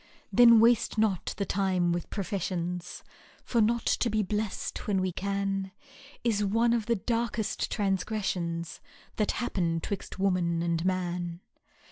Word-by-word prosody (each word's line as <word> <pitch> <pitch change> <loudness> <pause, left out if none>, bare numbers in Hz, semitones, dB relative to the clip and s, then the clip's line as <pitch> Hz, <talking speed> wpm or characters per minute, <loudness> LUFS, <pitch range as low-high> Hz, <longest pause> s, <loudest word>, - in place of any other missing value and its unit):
Then 235 -2 +8
waste 235 0 +3
not 210 -4 0
the 200 - -1
time 185 -3 +1
with 175 -1 -2
professions, 180 -3 -3 0.4
For 235 - +1
not 230 +2 +2
to 240 - +2
be 215 -1 +1
blest 210 +1 -3
when 200 -2 +2
we 185 0 0
can^ 195 0 -2 0.5
Is 215 -3 +1
one 230 +4 +2
of 230 -2 -1
the 235 - +3
darkest 230 0 -1
transgressions 190 -5 -2 0.4
That 210 - +1
happen 175 -8 -1
'twixt 195 +3 -5
woman 180 -3 +1
and 170 -1 0
man." 175 -2 -2
195 Hz, 135 wpm, -29 LUFS, 180-220 Hz, 0.5 s, Then